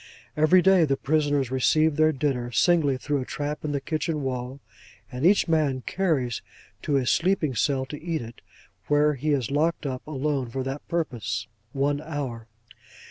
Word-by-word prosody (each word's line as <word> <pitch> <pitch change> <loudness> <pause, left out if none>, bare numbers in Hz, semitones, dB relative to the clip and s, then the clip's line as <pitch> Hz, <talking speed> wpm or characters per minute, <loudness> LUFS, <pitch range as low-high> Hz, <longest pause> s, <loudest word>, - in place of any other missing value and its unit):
Every 155 +4 +5
day, 190 -2 +5
the 135 -3 +1
prisoners 145 -3 0
receive 155 +4 +3
their 155 +1 +4
dinner, 130 -4 -2
singly, 150 -2 +3
through 145 +1 -1
a - - -5
trap 145 +2 -4
in 150 - -2
the 140 - -1
kitchen 155 +1 -2
wall; 130 0 -4 0.5
and 125 +2 -5
each 200 0 +4
man 150 -5 +1
carries 150 - 0
his - - -11 0.4
to 150 - -2
his 130 -3 +2
sleeping 170 -5 +1
cell 130 +3 0
to 150 +3 -9
eat 165 -5 -2
it, 115 0 -11 0.5
where 150 +1 +3
he 145 +3 -3
is 135 -4 0
locked 155 +3 0
up, 130 -2 -3
alone, 140 -3 -2
for 130 +2 -3
that 135 +2 -5
purpose, 120 -8 -2 0.3
one 140 +2 0
hour. 135 -8 -5
145 Hz, 175 wpm, -25 LUFS, 130-155 Hz, 0.5 s, Every